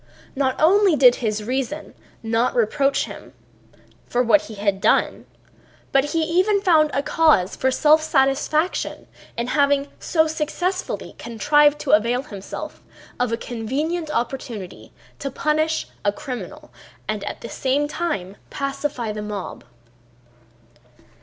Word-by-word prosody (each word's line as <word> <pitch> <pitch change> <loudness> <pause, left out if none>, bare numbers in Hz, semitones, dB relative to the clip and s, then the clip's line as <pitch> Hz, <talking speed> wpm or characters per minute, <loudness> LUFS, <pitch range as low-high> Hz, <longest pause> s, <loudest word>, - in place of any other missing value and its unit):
Not 265 -1 0
only 380 +2 +5
did 250 -4 +6
his 215 -3 -2
reason 265 +5 -3 0.3
not 225 +2 0
reproach 275 +5 +2
him - - -11 0.7
for 245 +1 +1
what 210 -3 +4
he 220 - -9
had 200 -1 -1
done, - - +1 0.6
but 270 0 +3
he 320 +2 0
even 370 +6 +2
found 325 -6 +4 0.2
cause 305 - +3
for 260 - +1
self 305 +4 +4
satisfaction 305 +3 0 0.3
in 235 - -1
having 280 +1 +2
so 320 -2 +2
successfully 330 +4 -3
contrived 295 +5 +3
to 275 - -1
avail 235 +5 +3
himself 200 -9 -8 0.4
of 245 -2 0
a 230 - 0
convenient 285 +9 -3
opportunity 235 -7 -4 0.3
to 275 - -3
punish 310 +3 0 0.2
a 205 - +2
criminal 250 +4 -8 0.4
and - - -3
at - - -6
the - - -6
same 275 +2 0
time 295 - -3
pacify 275 -4 -3
the 210 0 -5
mob. 210 -2 -6
275 Hz, 125 wpm, -22 LUFS, 230-310 Hz, 0.7 s, did